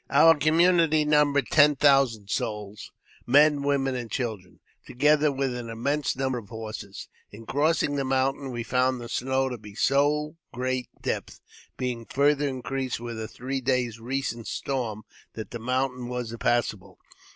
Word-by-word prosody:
Our 160 Hz, +4 st, +6 dB
community 160 Hz, 0 st, +3 dB
numbered 145 Hz, -2 st, +3 dB
ten 150 Hz, -1 st, +6 dB
thousand 135 Hz, -8 st, +3 dB
souls 105 Hz, -1 st, -4 dB, 0.2 s
— -, -, -27 dB
men, 145 Hz, +3 st, +5 dB
women, 140 Hz, -1 st, 0 dB
and 120 Hz, -2 st, -5 dB
children 110 Hz, -6 st, -4 dB
— -, -, -39 dB
together 150 Hz, +3 st, +3 dB
with 135 Hz, -2 st, -1 dB
an 120 Hz, -1 st, -6 dB
immense 140 Hz, +5 st, -1 dB
number 130 Hz, -1 st, -1 dB
of 100 Hz, -4 st, -14 dB
horses. 110 Hz, -3 st, -7 dB, 0.2 s
In 110 Hz, +2 st, -12 dB
crossing 145 Hz, +1 st, +1 dB
the 140 Hz, -, 0 dB
mountain, 135 Hz, +1 st, 0 dB
we 120 Hz, -2 st, -4 dB
found 125 Hz, +1 st, +1 dB
the 120 Hz, -, -7 dB
snow 130 Hz, +1 st, 0 dB
to 125 Hz, -2 st, -6 dB
be 105 Hz, -1 st, -12 dB
of -, -, -16 dB
so 150 Hz, +4 st, +1 dB
great 130 Hz, 0 st, -2 dB
depth, -, -, -3 dB, 0.4 s
being 120 Hz, -3 st, -3 dB
farther 145 Hz, +1 st, +2 dB
increased 130 Hz, -1 st, -3 dB
with 115 Hz, -1 st, -6 dB
a 110 Hz, -, -4 dB
three 130 Hz, +3 st, -4 dB
days' 125 Hz, -3 st, 0 dB
recent 120 Hz, -1 st, -3 dB
storm, 115 Hz, -6 st, -3 dB, 0.3 s
that 110 Hz, -, -7 dB
the 120 Hz, -, -5 dB
mountain 125 Hz, +1 st, -1 dB
was 125 Hz, -2 st, -4 dB
impassable. 110 Hz, -5 st, -1 dB
130 Hz, 165 wpm, -26 LUFS, 115-140 Hz, 0.4 s, Our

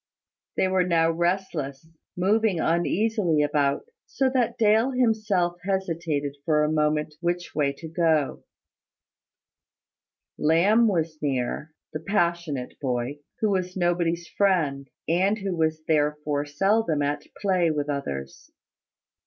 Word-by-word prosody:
They 190 Hz, -, +3 dB
were 185 Hz, -1 st, +2 dB
now 165 Hz, -2 st, +2 dB
restless, 165 Hz, -5 st, -2 dB, 0.3 s
moving 200 Hz, 0 st, +2 dB
uneasily 175 Hz, -1 st, +1 dB
about, 145 Hz, -, +1 dB, 0.2 s
so 265 Hz, -1 st, 0 dB
that 255 Hz, -3 st, 0 dB
Dale 220 Hz, +3 st, +4 dB
himself 215 Hz, -8 st, +1 dB
hesitated 165 Hz, -7 st, -2 dB
for 150 Hz, -1 st, +2 dB
a 150 Hz, -, +1 dB
moment 150 Hz, 0 st, +1 dB
which 175 Hz, 0 st, -2 dB
way 145 Hz, -2 st, +1 dB
to 160 Hz, +4 st, -9 dB
go. 160 Hz, -3 st, +1 dB, 2.0 s
Lamb 190 Hz, +10 st, +4 dB
was 165 Hz, -5 st, -1 dB
near, 140 Hz, +2 st, -2 dB, 0.2 s
the 155 Hz, -, -3 dB
passionate 170 Hz, -7 st, -1 dB
boy, 130 Hz, +1 st, -2 dB, 0.2 s
who 215 Hz, -2 st, +2 dB
was 185 Hz, -1 st, -1 dB
nobody's 170 Hz, -1 st, 0 dB
friend, 155 Hz, -9 st, +1 dB, 0.2 s
and 190 Hz, +6 st, +2 dB
who 195 Hz, -3 st, -3 dB
was 160 Hz, -1 st, 0 dB
therefore 150 Hz, -1 st, 0 dB
seldom 180 Hz, 0 st, +1 dB
at 145 Hz, +1 st, -2 dB
play 185 Hz, -4 st, +2 dB
with 150 Hz, -2 st, -1 dB
others. 70 Hz, -, -5 dB
165 Hz, 120 wpm, -25 LUFS, 150-190 Hz, 2.0 s, Dale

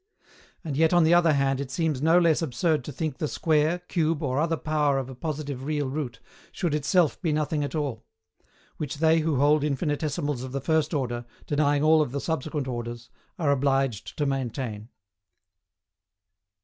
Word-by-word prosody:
And 155 Hz, -5 st, -4 dB
yet 160 Hz, +3 st, +3 dB
on 175 Hz, -1 st, +5 dB
the 160 Hz, +2 st, +4 dB
other 170 Hz, -2 st, +5 dB
hand 135 Hz, -1 st, +1 dB
it 140 Hz, -, -5 dB
seems 150 Hz, -1 st, -1 dB
no 165 Hz, +3 st, +5 dB
less 170 Hz, -3 st, +3 dB
absurd 155 Hz, 0 st, 0 dB
to -, -, -5 dB
think 155 Hz, +4 st, -4 dB
the 155 Hz, -, -1 dB
square, 155 Hz, +2 st, +1 dB
cube 165 Hz, -3 st, -1 dB
or 130 Hz, -1 st, 0 dB
other 165 Hz, +1 st, +1 dB
power 150 Hz, -3 st, +1 dB
of 130 Hz, -1 st, -3 dB
a -, -, -9 dB
positive 145 Hz, -2 st, -4 dB
real 145 Hz, -1 st, -1 dB
root, 130 Hz, -4 st, -4 dB, 0.3 s
should 175 Hz, -5 st, -2 dB
itself 155 Hz, +2 st, +2 dB
be 165 Hz, -5 st, 0 dB
nothing 150 Hz, 0 st, 0 dB
at 145 Hz, -, -4 dB
all; 140 Hz, -7 st, -3 dB, 0.7 s
which 145 Hz, -2 st, -4 dB
they 160 Hz, +1 st, +4 dB
who 155 Hz, -1 st, 0 dB
hold 145 Hz, +2 st, +3 dB
infinitesimals 145 Hz, -1 st, -1 dB
of 130 Hz, 0 st, -7 dB
the 140 Hz, -, -1 dB
first 160 Hz, +2 st, 0 dB
order, 120 Hz, -3 st, -2 dB, 0.2 s
denying 145 Hz, -1 st, +1 dB
all 155 Hz, 0 st, +5 dB
of 135 Hz, -4 st, -2 dB
the 140 Hz, -, -1 dB
subsequent 150 Hz, -2 st, -3 dB
orders, 120 Hz, -1 st, -6 dB, 0.3 s
are 155 Hz, -5 st, +1 dB
obliged 135 Hz, -5 st, 0 dB
to 150 Hz, -, 0 dB
maintain. 125 Hz, -5 st, -3 dB
145 Hz, 175 wpm, -26 LUFS, 135-160 Hz, 0.7 s, on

